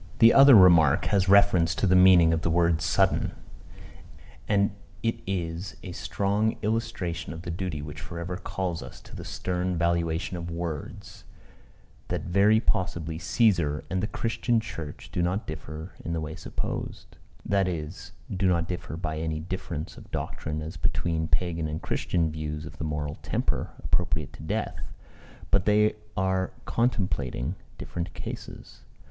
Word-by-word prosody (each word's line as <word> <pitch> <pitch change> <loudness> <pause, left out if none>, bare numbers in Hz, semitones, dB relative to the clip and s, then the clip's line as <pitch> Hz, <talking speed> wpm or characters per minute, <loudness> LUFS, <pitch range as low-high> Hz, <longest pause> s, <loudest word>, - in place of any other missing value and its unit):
The 115 0 +8
other 135 -1 +9
remark 85 -8 +7
has 95 -1 +3
reference 95 -4 +5
to - - +1
the 95 -1 +4
meaning 90 -3 +7
of 80 - 0
the 85 - 0
word 85 -1 +3
sudden. 90 +3 +2 1.1
And 100 -1 +3 0.3
it 115 0 0
is 90 -1 -3
a 90 - -6
strong 100 +9 0
illustration 100 -7 -2
of 85 +1 -8
the 85 - -4
duty 85 -4 -3
which 75 0 -7
for 85 - -7
ever 85 +2 -3
calls 90 -3 -3
us - - -10
to - - -13
the - - -6
stern 90 0 -2
valuation 85 +1 0
of 85 0 -5
words 85 -3 -6 0.8
that - - -2
very 100 +5 +4
possibly 85 -7 -1
Cæesar 85 -10 +2
and 95 0 0
the 105 - 0
Christian 115 +1 0
church 85 -9 -7
do 90 - 0
not 90 +5 0
differ 80 +2 -7
in 85 - -3
the 85 - -1
way 80 0 -4
supposed; - - -5 0.3
that 100 -1 +2
is, 80 -1 -5 0.2
do 95 +1 +2
not 85 -2 +2
differ 85 -3 -5
by 80 -3 -3
any 80 -1 -2
difference 85 -2 -5
of - - -13
doctrine 75 0 -4
as 80 - -7
between 80 -2 0
Pagan 85 -2 0
and 75 +1 -3
Christian 85 -3 0
views 75 0 -4
of 80 0 -11
the - - -3
moral 75 -1 -3
temper - - -1
appropriate 75 0 0
to - - -11
death, 105 +8 -3 0.6
but 100 -1 +3
that 105 - +4
they 105 +1 +4 0.2
are 95 0 0
contemplating 90 - 0 0.2
different 85 0 -5
cases. - - -8
85 Hz, 160 wpm, -27 LUFS, 80-95 Hz, 1.1 s, other